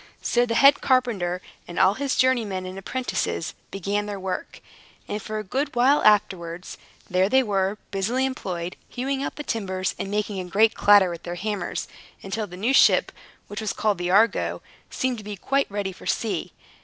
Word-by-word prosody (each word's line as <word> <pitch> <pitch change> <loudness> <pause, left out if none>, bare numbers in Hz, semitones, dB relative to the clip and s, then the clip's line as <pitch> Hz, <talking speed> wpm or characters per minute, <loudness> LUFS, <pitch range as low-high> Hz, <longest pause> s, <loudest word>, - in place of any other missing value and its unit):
So 245 0 +2
the 230 - -1
head 275 +3 +6
carpenter 205 -9 +1 0.2
and 175 - -8
all 190 +1 +5
his 275 +4 -1
journeymen 225 -8 +1
and 185 0 -7
apprentices 195 - -3 0.2
began 200 +2 -2
their 205 -1 -5
work; 190 -1 -5 0.5
and 210 - -3
for 215 +1 -5
a 215 - -3
good 270 +8 -2
while 265 +4 +4
afterwards, 190 -5 +1 0.3
there 185 +2 +2
they 265 +2 +4
were, 200 -2 0
busily 225 +7 0
employed, 180 -9 -4
hewing 270 +2 -2
out - - -3
the 295 - -6
timbers, 190 -7 -2
and 195 - -3
making 205 -1 -2
a 185 - -4
great 215 +4 +4
clatter 200 -3 +5
with 170 - -7
their 175 0 -5
hammers; 205 +2 -3 0.4
until 210 +2 -3
the 180 - -10
new 230 +8 +1
ship, - - +5 0.4
which 205 +1 -6
was 215 - -2
called 210 -4 0
the 175 0 -2
Argo, 210 +5 +2 0.3
seemed 255 -3 -1
to - - -10
be 205 0 -6
quite 275 +8 0
ready 200 -1 -3
for 180 - -12
sea. 200 -7 -1
205 Hz, 185 wpm, -24 LUFS, 190-240 Hz, 0.5 s, head